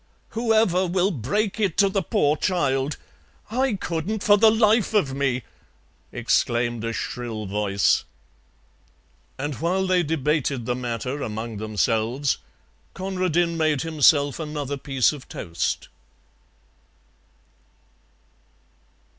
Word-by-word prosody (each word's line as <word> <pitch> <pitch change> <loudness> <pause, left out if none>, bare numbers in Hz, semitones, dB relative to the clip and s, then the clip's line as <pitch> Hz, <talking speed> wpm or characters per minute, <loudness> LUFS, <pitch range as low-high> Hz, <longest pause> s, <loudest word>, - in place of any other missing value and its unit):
"Whoever 220 -5 +2
will 185 +3 +1
break 195 - -1
it 200 -6 0
to 200 - +5
the 195 0 0
poor 150 -3 +1
child? 145 -5 0 0.5
I 260 +1 +1
couldn't 190 +4 -3
for 205 - +6
the 220 +2 +6
life 220 0 +3
of 145 -11 +2
me!" 135 -3 0 0.7
exclaimed 120 -1 0
a 115 - -1
shrill 110 +1 -4
voice. 100 0 +1 1.3
And 145 +2 -3
while 185 +3 +1
they 185 -1 +3
debated 150 -5 0
the 125 - 0
matter 125 +3 -4
among 110 -1 -4
themselves, 110 +5 0 0.6
Conradin 180 -3 0
made 155 -4 +1
himself 145 -2 +3
another 150 -3 -3
piece 135 -1 +1
of 145 -3 -11
toast. 85 -2 -3
150 Hz, 105 wpm, -24 LUFS, 125-185 Hz, 1.3 s, for